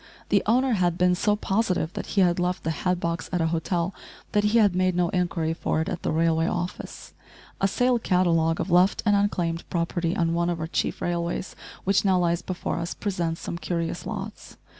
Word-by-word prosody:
The 200 - +4
owner 255 +4 +3
had 175 -4 +1
been 180 0 +3
so 205 +3 +2
positive 195 -5 0
that - - -5
he - - +6
had 175 -1 +3
left 180 0 -1
the 160 - 0
hat 180 +3 -1
box 170 0 -3
at 180 - 0
a 165 - +2
hotel 170 +2 -1 0.4
that 210 0 +2
he 210 +3 +3
had 205 -5 +4
made 185 -1 +2
no 175 -1 +2
inquiry 170 -3 0
for 165 - -1
it 160 - -1
at 185 -4 -3
the - - -1
railway 165 +1 +2
office. 175 0 -5 0.5
A 195 - +4
sale 245 +4 +2
catalogue 170 -5 +2
of 195 - -2
left 180 +3 +4
and 205 -1 +4
unclaimed 175 -5 0
property 170 0 -1
on 165 -1 +1
one 170 +1 +1
of 170 -1 -2
our 160 - -2
chief 160 - -2
railways, 170 +1 -2 0.3
which 195 +1 +2
now 190 -2 +3
lies 170 -1 +1
before 180 -1 -3
us, 170 +1 -4
presents 170 -5 -2
some 170 - -5
curious 170 -1 -3
"lots." 210 0 -7
180 Hz, 205 wpm, -25 LUFS, 170-195 Hz, 0.5 s, he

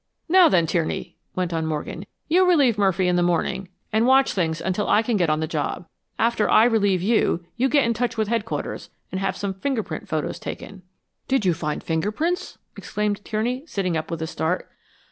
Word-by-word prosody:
"Now 360 +1 +6
then, 175 -3 +3
Tierney," 160 0 -2 0.2
went 180 -2 -1
on 160 -1 -1
Morgan, 160 +4 -4 0.2
"you 360 +4 +4
relieve 280 - +4
Murphy 190 -3 +2
in 180 0 +2
the - - +3
morning, 180 +2 0 0.2
and 220 +2 +3
watch 265 +1 +4
things 165 -4 -1
until 190 +3 -1
I 220 - +4
can 230 0 0
get 175 -5 +2
on 155 +1 +1
the 160 - -1
job. 155 +2 -3 0.3
After 230 -1 +1
I 220 - +6
relieve 205 -6 +2
you, 195 -5 +1
you 260 +3 +1
get 285 -1 +4
in 235 - +1
touch 235 +1 -2
with 220 -1 +1
Headquarters 225 0 -3 0.2
and 185 - -3
have 195 - -1
some 200 -1 -3
fingerprint 215 - -3
photos 155 -2 -2
taken." 195 -2 -7 0.5
"Did 265 -6 +1
you 180 - +4
find 150 -2 -3
finger 165 +5 -1
prints?" 335 +10 -2 0.2
exclaimed 210 -1 -2
Tierney, 240 +5 -2
sitting 185 - -1
up 155 0 -3
with 165 -1 -3
a - - -3
start. 160 +2 -2
200 Hz, 200 wpm, -23 LUFS, 170-235 Hz, 0.5 s, Now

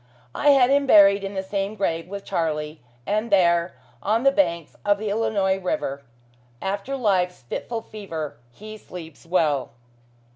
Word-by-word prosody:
I 290 - +2
had 270 -2 +5
him 280 0 +3
buried 200 -3 +6
in 195 0 -5
the 190 - -2
same 195 +2 -3
grave 165 -5 -1
with 200 +1 -7
Charlie; 155 -2 -2 0.2
and 215 - -1
there, 170 -2 +3 0.3
on 220 +4 +1
the 275 - +5
banks 170 - 0
of 205 -1 +3
the 210 0 -3
Illinois 200 -3 +1
river, 180 - -2 0.6
"After 200 - -3
life's 185 - 0
fitful 225 - -4
fever 165 -10 -6
he 215 - -10
sleeps 165 -4 -11
well." 155 -8 +1
195 Hz, 150 wpm, -24 LUFS, 170-215 Hz, 0.6 s, buried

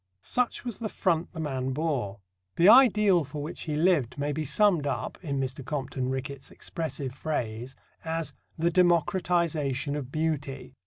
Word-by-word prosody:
Such 250 0 -1
was 240 -5 -4
the 220 -2 -4
front 170 -4 0
the 165 - -8
man 135 -4 -2
bore. 130 -10 -2 0.3
The 170 - +5
ideal 210 -7 +7
for 145 +2 -7
which 155 - -6
he 150 - 0
lived 155 -7 +2
may 145 +1 -1
be 155 +2 -2
summed 165 0 +3
up, - - -3
in 140 -4 -2
Mr. 130 0 -3
Compton 130 -2 -3
Rickett's 135 +1 -4
expressive 140 -5 -5
phrase, 125 -4 -3 0.3
as 165 0 -2 0.2
"the 170 +1 +2
democratization 170 -5 +2
of 135 -3 -5
beauty." 155 -4 -2
150 Hz, 155 wpm, -28 LUFS, 135-170 Hz, 0.3 s, ideal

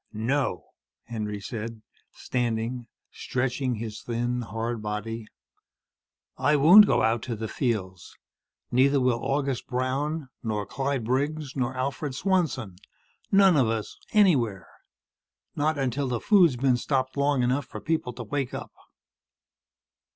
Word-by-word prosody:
"No," 115 -1 -1 0.4
Henry 105 -3 -4
said, 110 +1 -6 0.3
standing, 120 0 -2 0.2
stretching 130 0 -2
his 110 -1 -6
thin, 120 +1 -2
hard 115 0 -4
body. 105 +1 -4 1.1
"I 145 +3 +3
won't 180 +9 +8
go - - +2
out 115 +1 +2
to 115 - -1
the 110 +1 -4
fields. 100 - -3 0.6
Neither 135 +3 +4
will 125 -2 +1
August 135 -2 -1
Brown 135 +4 -2
nor 105 -3 -2
Clyde 135 +4 -2
Briggs 140 +4 -1
nor 130 -1 -2
Alfred 135 +1 -3
Swanson. 135 - 0 0.5
None 195 -3 +6
of 130 -5 +4
us. 110 -1 -3 0.2
Anywhere. 130 - +3 0.9
Not 150 +1 +1
until 135 0 -1
the 120 -2 -1
food's 180 - +5
been 130 -1 +2
stopped 130 +1 -1
long 140 -2 +2
enough 130 +3 0
for - - -7
people 155 -6 -1
to 120 - -7
wake 135 +3 -3
up." - - -7
125 Hz, 130 wpm, -26 LUFS, 115-140 Hz, 1.1 s, won't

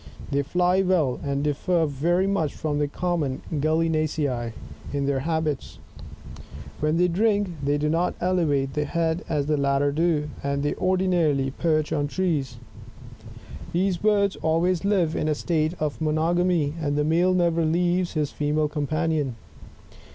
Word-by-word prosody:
They 140 0 +2
fly 180 +5 +2
well, 175 -9 +1
and 140 0 -1
differ 160 +3 +1
very 165 +6 +1
much 195 -7 0
from 150 -2 -2
the 145 - +1
Common 150 -4 -2
Gallinacem 155 -5 0 0.4
in 140 -1 -1
their 140 -1 0
habits. 155 -1 -2 1.0
When 155 +2 +1
they 180 +1 +4
drink, 205 +2 +1
they 145 +1 +1
do 150 +1 0
not 165 +3 0
elevate 150 -7 +1
the 150 0 -1
head 165 +2 -1
as 150 -3 0
the 150 0 +1
latter 140 0 +1
do, 155 -1 +1
and 140 0 -1
they 145 - 0
ordinarily 175 -8 +1
perch 155 +1 0
on 145 -2 0
trees. 155 -6 -1 1.2
These 185 +1 +1
birds 200 0 +2
always 165 +2 +1
live' 185 -6 +1
in - - -1
a 155 - +1
state 155 +1 0
of 155 0 -3
monogamy, 160 0 +1
and 145 -2 -1
the 150 - +1
male 175 +4 +2
never 170 -2 +2
leaves 175 +2 +1
his 150 -3 -1
female 150 +1 0
companion. 150 -2 -1
155 Hz, 150 wpm, -25 LUFS, 145-175 Hz, 1.2 s, they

